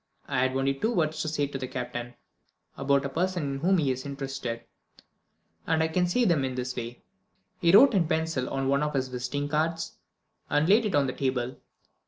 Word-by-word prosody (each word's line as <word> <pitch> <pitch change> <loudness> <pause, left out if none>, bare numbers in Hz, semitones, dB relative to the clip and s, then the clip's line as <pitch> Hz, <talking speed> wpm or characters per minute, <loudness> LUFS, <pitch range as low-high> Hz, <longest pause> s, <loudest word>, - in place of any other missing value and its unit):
I - - 0
had 130 +1 +1
only 135 +1 +1
two 180 - -1
words 155 -7 0
to - - -2
say 150 -2 0
to 140 -1 -5
the 130 - -4
Captain 120 -1 -5 0.6
about 140 0 +1
a - - -1
person 175 +3 -1
in 140 -1 -3
whom 185 +5 +3
he 145 -5 +2
is 130 0 -4
interested 135 -4 -5 1.0
and 160 0 +2
I 160 - 0
can 180 +2 +1
say 240 +8 +2
them 170 -8 +3
in 130 -1 -2
this 125 0 -3
way." 120 0 -6 0.6
He 170 - +4
wrote 245 +7 +8
in 180 -5 +2
pencil 160 -6 -1
on 135 0 -1
one 140 +1 +2
of 150 -1 -1
his 130 -1 0
visiting 125 +3 -3
cards, 160 +2 -1 0.5
and 150 +2 +2
laid 215 +3 +5
it 195 - -1
on 145 -1 +4
the 130 - -2
table. 130 -2 -1
140 Hz, 210 wpm, -27 LUFS, 130-165 Hz, 1.0 s, wrote